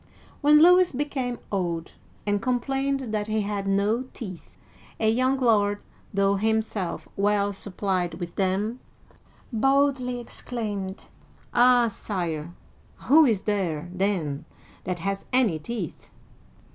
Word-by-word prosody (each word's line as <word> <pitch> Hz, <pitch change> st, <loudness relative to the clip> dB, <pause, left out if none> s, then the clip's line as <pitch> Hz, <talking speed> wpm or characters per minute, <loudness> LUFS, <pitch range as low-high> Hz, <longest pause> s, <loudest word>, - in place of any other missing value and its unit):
'* -, -, -27 dB
When 300 Hz, +2 st, +7 dB
Louis 360 Hz, +1 st, +6 dB
became 260 Hz, -3 st, -2 dB
old 170 Hz, -4 st, -2 dB, 0.3 s
and 205 Hz, -1 st, +1 dB
complained 270 Hz, 0 st, -1 dB
that 210 Hz, -1 st, -1 dB
he 215 Hz, 0 st, 0 dB
had 200 Hz, -1 st, -3 dB
no 200 Hz, +4 st, +2 dB
teeth, 185 Hz, -8 st, -9 dB, 0.4 s
a 220 Hz, -, +2 dB
young 255 Hz, +3 st, +2 dB
lord, 205 Hz, -5 st, +3 dB, 0.3 s
though 200 Hz, 0 st, +2 dB
himself 220 Hz, -3 st, -1 dB
well 205 Hz, 0 st, +1 dB
supplied 185 Hz, -3 st, -2 dB
with 170 Hz, 0 st, -7 dB
them, 200 Hz, +5 st, 0 dB, 0.7 s
boldly 270 Hz, 0 st, +2 dB
exclaimed, 210 Hz, -5 st, -5 dB, 0.5 s
"Ah, 245 Hz, 0 st, +5 dB
Sire, 170 Hz, -7 st, -4 dB, 0.6 s
who 315 Hz, +2 st, +8 dB
is 220 Hz, -7 st, +1 dB
there, 180 Hz, -7 st, -1 dB
then, 175 Hz, -6 st, -1 dB, 0.4 s
that 180 Hz, 0 st, -2 dB
has 195 Hz, +3 st, -3 dB
any 235 Hz, -11 st, +3 dB
teeth 190 Hz, 0 st, -6 dB
210 Hz, 120 wpm, -26 LUFS, 190-245 Hz, 0.7 s, who